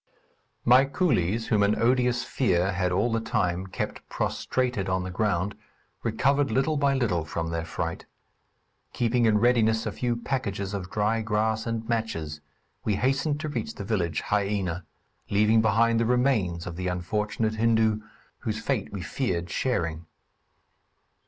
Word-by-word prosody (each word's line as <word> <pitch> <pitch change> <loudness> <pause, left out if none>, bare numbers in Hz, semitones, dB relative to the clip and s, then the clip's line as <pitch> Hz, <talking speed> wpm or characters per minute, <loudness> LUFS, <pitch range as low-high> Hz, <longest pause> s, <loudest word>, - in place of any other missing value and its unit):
My 125 +3 +7
coolies, 115 - 0
whom 105 -2 +3
an 100 +1 +2
odious 125 0 +2
fear 95 -7 +1
had 90 -1 0
all 105 +6 +1
the 115 - +1
time 95 -4 -1
kept 95 - -4
prostrated 125 -7 -1
on 95 0 0
the 95 - -5
ground, 100 0 0 0.5
recovered 135 +5 +2
little 135 +7 +1
by 140 -1 +2
little 105 -11 +1
from 80 +1 -3
their 85 0 -2
fright. 85 +1 -4 0.9
Keeping 120 0 +2
in 105 -1 +4
readiness 110 -1 +3
a - - -1
few 120 -1 -1
packages 105 -6 -3
of 95 -3 -4
dry 105 +2 +1
grass 110 +1 0
and 115 -1 -3
matches, 80 -11 -2 0.4
we 105 - +1
hastened 135 +6 +1
to 155 - -3
reach 120 -6 -4
the - - -6
village 95 -6 -1
Haïena, 100 -4 -1 0.4
leaving 105 +2 +4
behind 115 +1 +3
the 115 - +2
remains 115 -9 +1
of 85 -1 -6
the 90 0 -2
unfortunate 105 +5 -1
Hindu, 110 -1 +2 0.4
whose 110 -1 -3
fate 110 -1 -2
we 100 -3 -5
feared 90 -10 -2
sharing. 85 -10 -1
110 Hz, 150 wpm, -27 LUFS, 95-120 Hz, 0.9 s, My